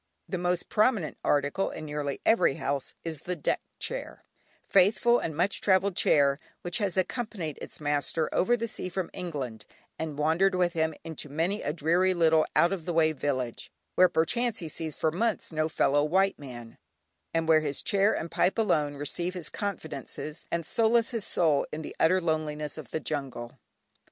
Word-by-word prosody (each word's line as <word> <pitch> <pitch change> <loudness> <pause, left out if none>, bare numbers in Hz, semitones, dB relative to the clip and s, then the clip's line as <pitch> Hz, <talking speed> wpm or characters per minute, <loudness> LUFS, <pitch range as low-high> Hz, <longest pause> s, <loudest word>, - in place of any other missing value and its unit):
The 185 - -3
most 180 0 0
prominent 215 - +1
article 145 +6 +1
in 155 - -7
nearly 145 -2 -3
every 225 -11 +4
house 140 -1 -3
is 160 -3 -4
the 180 +4 -4
deck 160 - -1 0.2
chair, - - -5 0.4
faithful 220 +5 +4
and 160 -2 -4
much 185 +4 +1
travelled 190 -1 +3
chair, 140 -4 +4 0.2
which 175 0 -1
has 195 -4 0
accompanied 185 - -2
its - - -6
master 150 +1 0
over 240 +6 +3
the 230 0 -2
sea 185 - -5
from 185 -1 -3
England, 135 -11 -5 0.4
and 155 -3 -4
wandered 165 +6 +3
with 175 -1 +2
him 160 -2 0
into 160 -2 -6
many 165 +8 -1
a 145 - -1
dreary 175 +4 +2
little 160 -2 +4
out 175 +3 +4
of 175 -5 -5
the 175 - -2
way 160 -1 +4
village, 130 -5 -3 0.2
where 185 0 +6
perchance 235 +8 +1
he 165 - -5
sees 155 0 -5
for 160 - +1
months 220 +5 -1
no 155 0 0
fellow 145 -2 +2
white 190 +5 +2
man, 120 -5 -10 0.5
and 165 0 0
where 160 -1 +6
his 145 -2 -2
chair 200 0 +3
and 165 - -3
pipe 180 - +2
alone 155 -10 +1
receive 170 +6 -3
his 170 -5 -3
confidences, 155 -5 -5
and 170 -1 -2
solace 230 +5 +2
his 230 -4 -2
soul 155 -5 +2
in 155 +1 -5
the - - -8
utter 185 +3 +4
loneliness 155 -3 -2
of 155 - -9
the - - -2
jungle. 135 -6 -5
165 Hz, 180 wpm, -28 LUFS, 150-185 Hz, 0.5 s, where